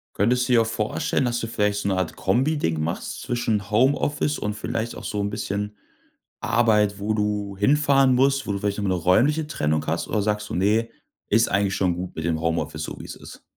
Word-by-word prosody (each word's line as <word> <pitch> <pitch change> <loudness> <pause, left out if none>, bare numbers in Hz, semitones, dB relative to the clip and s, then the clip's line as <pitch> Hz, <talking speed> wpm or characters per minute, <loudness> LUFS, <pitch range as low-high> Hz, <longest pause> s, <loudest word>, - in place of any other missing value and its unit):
Könntest 125 +5 +2
du - - +4
dir 115 - +6
auch - - -5
vorstellen, 115 +3 -1
dass 120 -1 0
du 115 - -3
vielleicht 105 -2 0
so - - -2
'ne 95 - +1
Art 95 -3 -2
Kombi-Ding 120 - +1
machst 85 +3 -4
zwischen 110 -4 -1
Homeoffice 145 +5 +1
und 105 0 -3
vielleicht 110 +2 -3
auch - - -9
so 105 -1 -2
'n 100 - -1
bisschen 105 0 -4 0.6
Arbeit, 105 -4 +2
wo 105 +2 -1
du 105 -2 -2
hinfahren 135 +2 +4
musst, 135 +1 +2
wo 100 - -1
du 100 - -2
vielleicht 100 0 -1
noch 105 - -2
mal - - 0
'ne 90 - -2
räumliche 145 - +3
Trennung 75 - -1
hast, 80 +2 -2
oder 105 - 0
sagst 105 0 -1
du: - - -3
„Ne, 110 +5 +1 0.4
ist 115 +3 +3
eigentlich 100 0 +1
schon 90 -3 +1
gut 90 0 -6
mit 80 - -4
dem 80 -2 0
Homeoffice, 80 0 -2
so - - -6
wie - - -7
es - - -8
ist.“? - - -12
105 Hz, 220 wpm, -24 LUFS, 100-120 Hz, 0.6 s, dir